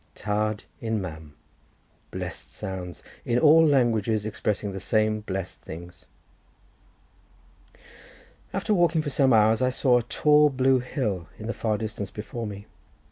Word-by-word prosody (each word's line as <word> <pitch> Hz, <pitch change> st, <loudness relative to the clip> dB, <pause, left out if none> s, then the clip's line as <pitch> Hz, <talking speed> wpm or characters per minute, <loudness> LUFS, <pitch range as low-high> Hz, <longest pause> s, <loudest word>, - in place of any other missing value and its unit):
Tad 105 Hz, 0 st, -1 dB, 0.2 s
im 110 Hz, -1 st, -1 dB
mam; 80 Hz, -5 st, -8 dB, 0.7 s
blessed -, -, -6 dB
sounds; 90 Hz, -2 st, -7 dB, 0.2 s
in 120 Hz, -, 0 dB
all 160 Hz, +4 st, +7 dB
languages 115 Hz, -7 st, +2 dB
expressing 105 Hz, -1 st, -2 dB
the 95 Hz, -, -5 dB
same 110 Hz, +1 st, +1 dB
blessed 95 Hz, -6 st, -5 dB
things. 85 Hz, +3 st, -10 dB, 2.4 s
After 215 Hz, -, 0 dB
walking 170 Hz, -4 st, +3 dB
for 145 Hz, -, -3 dB
some 135 Hz, -1 st, +3 dB
hours 110 Hz, 0 st, +4 dB
I 130 Hz, -, +3 dB
saw 125 Hz, -1 st, +3 dB
a -, -, -2 dB
tall 150 Hz, +5 st, +4 dB
blue 130 Hz, -1 st, +3 dB
hill 105 Hz, -, -3 dB
in 110 Hz, -, -8 dB
the 115 Hz, -, -2 dB
far 110 Hz, -2 st, -1 dB
distance 105 Hz, -2 st, -5 dB
before 110 Hz, +2 st, -6 dB
me. 100 Hz, 0 st, -8 dB
110 Hz, 135 wpm, -26 LUFS, 100-130 Hz, 2.4 s, all